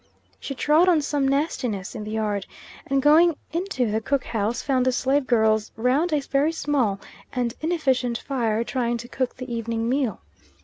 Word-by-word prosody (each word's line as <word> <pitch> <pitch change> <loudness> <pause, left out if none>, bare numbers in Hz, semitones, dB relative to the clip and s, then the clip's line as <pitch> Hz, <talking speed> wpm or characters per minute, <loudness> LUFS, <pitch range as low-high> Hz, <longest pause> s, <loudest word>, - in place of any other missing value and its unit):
She 275 - -5
trod 310 +7 +4
on 320 -4 +3
some 285 -2 0
nastiness 260 - -1
in 215 - -6
the 210 - -6
yard, 210 -2 -2 0.4
and 275 -1 +1
going 320 +3 +6 0.2
into 330 - -1
the 220 +1 0
cook 275 +3 0
house 225 +1 -2
found 260 -2 +1
the - - +4
slave 265 +2 +1
girls 220 -2 +2
round 260 +9 +1
a 300 -2 +2
very 275 +3 +1
small 275 -11 0 0.3
and 245 -2 -1
inefficient 265 -7 0
fire, 230 -5 -1
trying 240 -1 -1
to 235 +1 -8
cook 255 0 -2
the 255 -1 -6
evening 230 0 -2
meal. 260 -2 0
255 Hz, 175 wpm, -24 LUFS, 230-290 Hz, 0.4 s, going